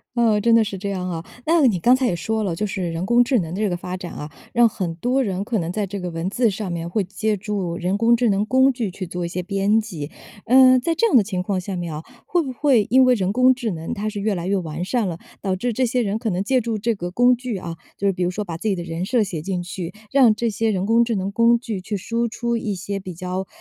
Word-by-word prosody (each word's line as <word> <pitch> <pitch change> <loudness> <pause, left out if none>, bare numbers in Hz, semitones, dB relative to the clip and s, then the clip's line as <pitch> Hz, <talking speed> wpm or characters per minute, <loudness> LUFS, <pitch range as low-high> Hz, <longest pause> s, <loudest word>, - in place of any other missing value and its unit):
呃， 230 -3 +3
真 230 +2 +3
的 230 -1 +6
是 200 -2 -5
这 200 +2 -4
样 185 -2 -3
啊。 165 -1 -5 0.2
那 325 -2 +4
你 210 -8 +3
刚 245 +9 +5
才 260 0 0
也 180 - +1
说 220 +5 -2
了， 185 -5 -1
就 210 +5 -2
是 185 -3 -3
人 165 +2 -3
工 240 +4 +5
智 245 0 +2
能 165 -4 -4
的 - - -4
这 215 - +1
个 175 - -1
发 180 +1 -5
展 180 -1 -7
啊， 150 - -7 0.2
让 235 -1 +5
很 180 -5 -3
多 250 +10 +1
人 195 -3 -2
可 225 +2 -1
能 170 -3 -2
在 205 +1 -2
这 200 +1 -5
个 180 -1 -4
文 165 +2 -3
字 235 +3 +2
上 195 -1 -4
面 170 -1 -3
会 205 +4 0
借 210 +3 -1
助 195 -4 -3
人 180 +3 -1
工 230 +2 +4
智 235 -1 +2
能 200 +1 +1
工 260 +4 +4
具 235 -6 -3
去 185 0 -6
做 175 0 -4
一 - - -2
些 180 +1 -3
编 200 +3 +1
辑， 165 -9 -7 0.3
嗯， 255 +1 +7
在 330 +7 0
这 460 +8 +2
样 435 - +2
的 220 - +5
情 185 -3 -3
况 190 0 -1
下 190 +1 -5
面 175 -2 -4
啊， 155 - -6 0.2
会 350 -1 +1
不 265 -3 -5
会 250 -4 +3
因 260 +1 +6
为 255 -1 +5
人 195 -2 -1
工 255 +2 +5
智 240 -3 -3
能 165 -2 -5
它 210 +1 -3
是 210 -1 -3
越 210 0 0
来 175 -1 -4
越 195 +2 +1
完 165 -1 -4
善 230 +1 0
了， 170 -3 -4 0.2
导 190 -2 -1
致 240 +6 -2
这 260 - 0
些 250 +1 0
人 210 +1 -1
可 225 -1 -2
能 185 0 -1
借 255 +4 +2
助 225 -1 -2
这 230 +3 0
个 175 -4 -5
工 245 +7 +4
具 245 -3 -4
啊， 170 -2 -6 0.2
就 200 - 0
是 195 - +2
比 180 - -6
如 175 - +2
说 205 +3 -3
把 170 -3 -5
自 220 - -4
己 200 - +2
的 175 - -5
人 170 +1 -4
设 230 +2 +2
写 175 -6 -4
进 180 +1 -3
去， 180 0 -6 0.2
让 255 -6 +5
这 235 - -1
些 225 +1 0
人 190 -3 0
工 230 +2 +4
智 230 -1 -1
能 195 0 -2
工 235 +2 +4
具 225 -5 -5
去 205 +2 -3
输 230 +5 -1
出 235 +1 -2
一 215 -3 -2
些， 195 +2 -4
比 185 -2 -8
较， 185 +2 -4
205 Hz, 320 characters per minute, -22 LUFS, 180-235 Hz, 0.3 s, 嗯